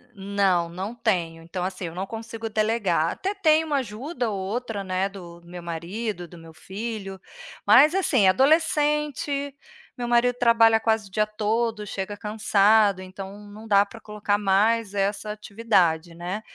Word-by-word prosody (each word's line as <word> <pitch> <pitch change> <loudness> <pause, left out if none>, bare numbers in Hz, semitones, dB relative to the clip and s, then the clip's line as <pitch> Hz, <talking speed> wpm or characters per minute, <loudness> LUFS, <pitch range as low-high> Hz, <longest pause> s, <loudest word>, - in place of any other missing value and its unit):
Não, 195 -3 +1
não 190 +6 -5
tenho. 175 -8 -1
Então, 175 +2 -5
assim, 185 -1 -4
eu 165 +1 -7
não 190 +2 -3
consigo 225 +1 -6
delegar, 210 -7 +1
até 390 +2 -3
tenho 320 -5 +3
uma 290 -2 +1
ajuda 245 +2 -3
ou 200 - -3
outra, 205 +1 -4
né, 185 +1 -1
do 175 -3 -11
meu 175 0 -9
marido, 175 +3 -5
do 175 - -14
meu 165 -1 -13
filho, 195 0 -6 0.5
mas, 270 - +6
assim, 265 - +3
é - - +7
adolescente, 295 - +1 0.4
meu 240 -1 -3
marido 240 +1 +3
trabalha 230 -2 +5
quase 220 -2 0
o - - -20
dia 215 +2 +1
todo, 215 +1 -1
chega 200 +1 -5
cansado, 210 -2 +3
então 190 +2 -9
não 215 +2 -11
dá 200 -1 +5
para 225 +2 -13
colocar 210 -1 -1
mais 205 +2 +2
essa 200 +1 -1
atividade, 195 -6 0
né, 180 +5 -5
210 Hz, 160 wpm, -24 LUFS, 190-230 Hz, 0.5 s, é